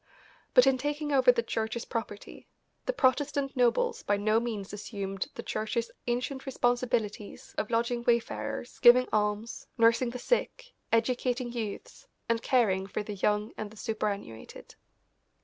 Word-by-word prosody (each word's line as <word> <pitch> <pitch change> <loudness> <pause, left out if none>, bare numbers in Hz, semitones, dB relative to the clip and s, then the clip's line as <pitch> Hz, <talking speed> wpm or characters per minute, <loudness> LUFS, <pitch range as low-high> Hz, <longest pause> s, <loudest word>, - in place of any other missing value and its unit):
But 250 0 +8
in 265 -1 +3
taking 295 +2 -2
over 260 -3 +6
the 235 -1 -1
Church's 225 +1 -3
property 220 -3 -6 0.4
the - - +3
Protestant 280 - +1
nobles 255 - +2
by 205 - +1
no 215 +2 +2
means 220 -5 -4
assumed 195 -2 -4
the - - -6
Church's 225 +2 -2 0.2
ancient 250 +3 -2
responsibilities 240 -5 -1
of 215 - -2
lodging 235 +1 0
wayfarers, 235 0 -1
giving 250 +1 +7
alms, 210 +1 -1
nursing 230 +1 +4
the 245 - -5
sick, - - -1 0.2
educating 245 +1 +1
youths, 230 - -6 0.2
and 230 0 +1
caring 195 -8 +2
for 210 - -3
the 210 - -6
young 210 +2 0
and 215 - -4
the 215 - -16
superannuated. 205 - -5
235 Hz, 140 wpm, -29 LUFS, 215-250 Hz, 0.4 s, But